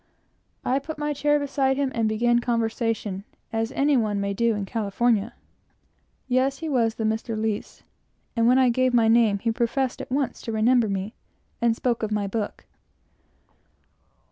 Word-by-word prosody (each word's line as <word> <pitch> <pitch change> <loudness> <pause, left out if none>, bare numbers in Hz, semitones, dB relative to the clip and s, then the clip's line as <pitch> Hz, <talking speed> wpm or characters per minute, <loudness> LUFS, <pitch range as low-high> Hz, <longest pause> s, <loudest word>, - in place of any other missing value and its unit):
I 260 +2 +2
put 310 +3 -7
my 295 0 -1
chair 295 +1 +2
beside 275 -2 0
him, 280 -2 0
and 225 -2 +1
began 240 +2 +2
conversation, 225 -4 -1 0.3
as 225 +1 -1
any 285 +1 +2
one 215 -4 +1
may 200 0 -1
do 230 +2 +1
in 205 -1 -3
California. 225 +1 0 0.9
Yes, 260 +2 +1
he 325 - -5
was 235 -6 +1
the 225 - -3
Mr. 220 +1 -1
Lies; 215 -1 -3 0.5
and 230 -1 +3
when 250 +2 +5
I 260 -1 +5
gave 255 +1 +2
my 230 -2 +4
name 225 -3 +4
he 230 +3 -1
professed 245 +2 -1
at - - -9
once 275 -1 -1
to 230 - -5
remember 225 +1 +3
me, 195 +2 -3 0.5
and 235 -1 +3
spoke 240 0 -1
of 215 -1 -2
my 210 -1 0
book. 205 +1 -4
235 Hz, 170 wpm, -25 LUFS, 220-255 Hz, 0.9 s, when